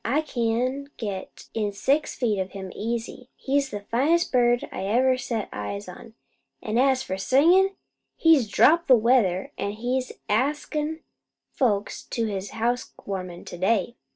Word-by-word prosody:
I 280 +6 +1
can 255 +1 -1
get 200 -4 -6
in 210 -2 -1
six 280 +9 0
feet 220 -5 0
of 190 0 -4
him 190 -2 -7
easy. 235 +3 -4
He's 275 0 0
the 205 -3 -5
finest 285 +11 +1
bird 245 -1 +3
I 190 - -4
ever 255 +5 +3
set 235 -4 -3
eyes 200 - -5
on; 220 +5 -11 0.4
an' 220 +2 -1
as 265 0 +3
for 190 0 -4
singin', 350 - +4 0.4
he's 315 -8 +5
dropped 330 +11 +4
the 260 - +8
weather, 215 -6 +2
an' 200 - -2
he's 250 +4 -2 0.2
askin' 295 +7 -1 0.5
folks 210 -6 0
to 230 - -2
his 200 -2 -4
housewarmin' 200 -6 -4
to 175 - -8
day. 215 +3 +1
235 Hz, 150 wpm, -25 LUFS, 205-270 Hz, 0.5 s, the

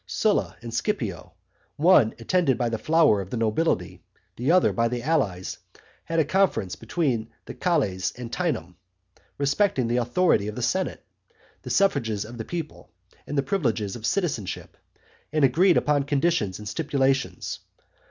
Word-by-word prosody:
Sylla - - 0
and - - -7
Scipio, - - -3 0.4
one 150 -9 +5
attended 140 +2 +1
by 120 -2 0
the 115 -1 -3
flower 155 -8 +4
of 95 - -8
the 120 - -3
nobility, 115 +9 0 0.3
the 125 +5 -2
other 185 +1 +4
by 115 0 +2
the 120 0 -3
allies, 105 - -1 0.5
had 165 - -2
a 160 - +4
conference 170 - +1
between 115 -3 -1 0.3
Cales 95 -1 +1
and 120 -2 -7
Teanum, 90 - -2 0.6
respecting 140 - +1
the 120 +1 0
authority 120 - +2
of 105 - -5
the 125 - -4
senate, 185 +11 -1 0.6
the - - -8
suffrages 115 - +1
of 120 +2 -10
the 115 - -4
people, 165 -3 -6 0.4
and 145 - -3
the 140 - +3
privileges 115 - -1
of 115 -1 -4
citizenship; 140 - -2 0.6
and 155 -2 +4
agreed 175 +8 +4
upon 150 -1 +2
conditions 140 - 0
and 105 - -9
stipulations. 135 +2 -1
130 Hz, 150 wpm, -25 LUFS, 110-165 Hz, 0.6 s, one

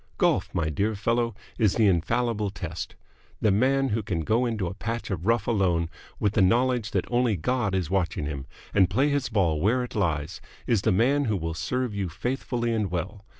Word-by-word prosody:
Golf, - - +2
my 80 -2 -1
dear 105 +7 0
fellow, 115 +2 0 0.2
is 105 -4 +3
the 110 - +4
infallible 105 +4 +1
test. 90 -4 -6 0.4
The 105 - +3
man 135 +6 +2
who 115 0 0
can 90 -5 -2
go 115 +8 +1
into 110 -5 -2
a 85 - -3
patch 115 +2 -4
of 90 0 -3
rough 115 -2 +2
alone, 90 -7 +1 0.3
with 105 -1 +1
the 105 - +3
knowledge 120 +3 +2
that 95 - -1
only 120 -3 +2
God 100 +3 0
is 90 -3 -1
watching 90 -6 0
him, 70 -2 -5 0.3
and 95 -3 +4
play 130 +9 +2
his 140 -2 0
ball 85 -9 +1
where 120 +7 +2
it 125 - -7
lies, 80 -5 -1 0.2
is 115 -5 +2
the - - +2
man 135 +9 +3
who 110 -4 0
will 80 -2 -3
serve 125 +6 -2
you 100 -3 -2
faithfully 120 +5 -2
and 105 -3 0
well. 90 +4 -4
105 Hz, 200 wpm, -26 LUFS, 90-120 Hz, 0.4 s, the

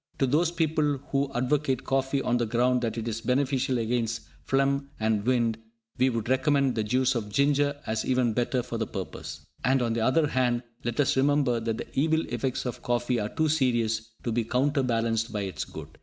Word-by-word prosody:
To 135 - +2
those 155 +6 +2
people 155 -3 +1
who 140 0 +1
advocate 130 +1 0
coffee 135 +1 0
on 120 - +1
the 120 -1 0
ground 125 +2 +2
that 115 -1 -2
it 115 0 -3
is 115 0 -3
beneficial 130 +1 +1
against 115 -1 -1 0.2
"phlegm" 140 +1 +1
and 110 -1 +1
"wind", 115 -3 +2 0.4
we 130 +1 +4
would 115 -3 -2
recommend 135 +1 +2
the 110 -2 -1
juice 130 +5 +2
of 110 -4 -3
ginger 145 +4 +2
as 110 0 -1
even 125 -3 +1
better 125 +2 0
for 115 -2 -5
the 110 - -1
purpose. - - -7 0.2
And, 130 +1 +3
on 115 -1 0
the 115 - -1
other 130 +7 +3
hand, 125 -3 +1 0.2
let 120 +2 -3
us 145 - +3
remember 135 -3 +3
that 115 -1 -2
the - - -6
evil 160 +2 +3
effects 125 +2 -2
of 125 - -4
coffee 120 0 0
are 105 0 -2
too 160 +6 0
serious 120 -6 +1
to 120 - -1
be 115 +1 +1
counter 135 +5 +1
balanced 115 -2 0
by 105 -2 -2
its 95 -2 -4
good. - - -10
125 Hz, 200 wpm, -27 LUFS, 115-135 Hz, 0.4 s, we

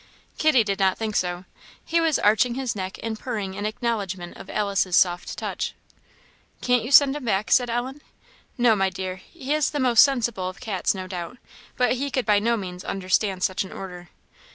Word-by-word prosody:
Kitty 305 -7 +4
did 200 -2 -2
not 190 -1 +2
think 220 -2 -3
so; 180 0 -1 0.4
he 335 0 +1
was 325 -3 +2
arching 220 +4 +3
his 260 -3 -2
neck 190 -1 -5
and 225 -1 -4
purring 210 -6 -4
in 205 +2 -3
acknowledgment 210 -6 -3
of - - -11
Alice's 200 -3 0
soft 175 -1 +2
touch. - - -4 0.8
"Can't 245 -1 +2
you 235 - -5
send 280 0 +7
him 295 - -6
back?" 215 0 0
said 245 -1 +4
Ellen. 255 +5 -3 0.6
"No, 240 -3 +4
my 195 -1 +1
dear; 185 0 -5
he 280 - -5
is 305 -1 +2
the 295 - -3
most 245 -4 +5
sensible 235 -9 0
of 185 - -11
cats, 205 -6 -1
no 185 -1 -5
doubt, 180 +4 -6 0.4
but 250 - +3
he 280 +2 -2
could 260 -2 -1
by 210 -2 +4
no 230 +2 +1
means 180 -3 -6
understand 190 0 0
such 185 - +1
an 190 - -10
order. 180 -3 -8
215 Hz, 195 wpm, -24 LUFS, 190-250 Hz, 0.8 s, send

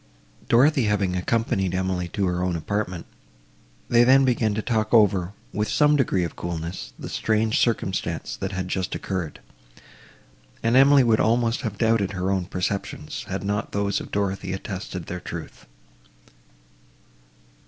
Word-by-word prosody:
Dorothée 130 0 +4
having 100 -3 +1
accompanied 95 -1 0
Emily 95 -1 -1
to 95 +3 -1
her 90 -1 -1
own 90 -1 0
apartment, 90 +1 -3 0.8
they 120 0 +5
then 135 +2 +6
began 115 -4 +1
to 110 - -1
talk 110 -3 0
over, 100 -5 +3 0.2
with 105 0 -1
some 150 +5 +4
degree 115 -10 +1
of 85 - -4
coolness, 85 +1 -5
the - - -7
strange 110 0 +1
circumstance, 100 -5 -1
that 95 - -4
had 90 -1 -3
just 95 0 -2
occurred; 90 -5 -4 1.2
and 115 +2 +2
Emily 135 +1 +7
would 115 -2 +3
almost 115 +1 +2
have 110 -6 -4
doubted 110 -3 +1
her 95 0 -1
own 95 -2 0
perceptions, 95 +2 -4
had - - -4
not 100 0 -2
those 100 -1 0
of - - -9
Dorothée 100 -2 -2
attested 95 -3 -6
their 90 +2 -5
truth. 85 -6 -8
100 Hz, 145 wpm, -24 LUFS, 90-115 Hz, 1.2 s, Emily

